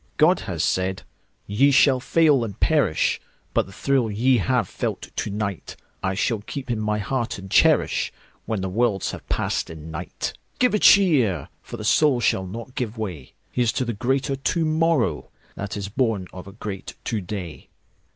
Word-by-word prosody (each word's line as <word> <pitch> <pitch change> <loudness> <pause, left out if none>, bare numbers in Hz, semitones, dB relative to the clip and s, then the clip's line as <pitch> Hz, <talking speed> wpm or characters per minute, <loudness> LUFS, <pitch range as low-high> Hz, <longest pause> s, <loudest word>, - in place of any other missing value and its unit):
God 170 +4 +5
has 85 -2 -1
said: 95 0 0 0.4
"Ye 120 +8 +3
shall 135 -1 +5
fail 145 -1 +3
and 105 -4 -6
perish; - - +2 0.3
But - - +1
the - - -12
thrill 130 +2 +1
ye 120 +4 +3
have 125 -1 +1
felt - - -4
to - - -2
nightI 100 -1 -4
shall 115 +1 +1
keep 130 +4 -6
in 115 - -1
my 105 0 0
heart 120 +3 -2
and 95 -1 -10
cherishWhen 110 -4 +1
the 95 - -2
worlds 105 -1 0
have - - -10
passed - - -1
in 80 0 -9
night."Give 90 - -3
a 210 - +3
cheer! 150 - +5
For 120 - -8
the 105 - -7
soul 140 +2 +4
shall 95 -5 +1
not 115 +6 -8
give 120 -3 -3
way. 90 -11 -6 0.2
Here's 120 -3 +1
to 130 - -1
the 120 - -2
greater 135 +5 0
to 160 +5 0
morrowThat 155 - -1
is 100 -1 -4
born 110 -4 0
of 90 +1 -9
a - - -9
great 105 -2 -6
to 110 -3 -2
day! 90 -3 -7
110 Hz, 170 wpm, -23 LUFS, 95-130 Hz, 0.4 s, God